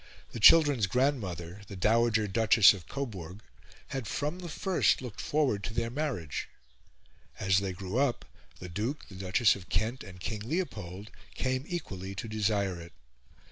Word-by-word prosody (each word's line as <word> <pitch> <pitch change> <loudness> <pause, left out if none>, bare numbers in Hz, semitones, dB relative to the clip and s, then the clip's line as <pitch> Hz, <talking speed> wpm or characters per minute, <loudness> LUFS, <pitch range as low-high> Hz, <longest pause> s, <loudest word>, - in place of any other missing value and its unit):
The 120 - -6
children's 140 -3 +7
grandmother, 100 - -1
the 100 - -8
Dowager 110 +2 +2
Duchess 110 0 +6
of 90 -5 -10
Coburg, 105 -7 -6 0.5
had 130 -5 -4
from 150 +5 -2
the 175 -2 -7
first 185 +4 +2
looked 125 -5 -7
forward 140 -10 0
to 110 - -6
their 115 -1 -1
marriage, 125 - -3 0.9
as 95 -1 +3
they 100 -1 -3
grew 95 +5 -3
up, 140 -3 0 0.3
the 90 - -7
Duke, 110 - -4
the 95 - -11
Duchess 95 +4 +3
of 90 -4 -12
Kent, 110 +8 -1
and 95 -3 -11
King 105 +3 -4
Leopold 105 - -4 0.2
came 130 +1 -1
equally 95 - -5
to 105 - -5
desire 100 -4 0
it. 85 - -12
110 Hz, 155 wpm, -30 LUFS, 95-130 Hz, 0.9 s, children's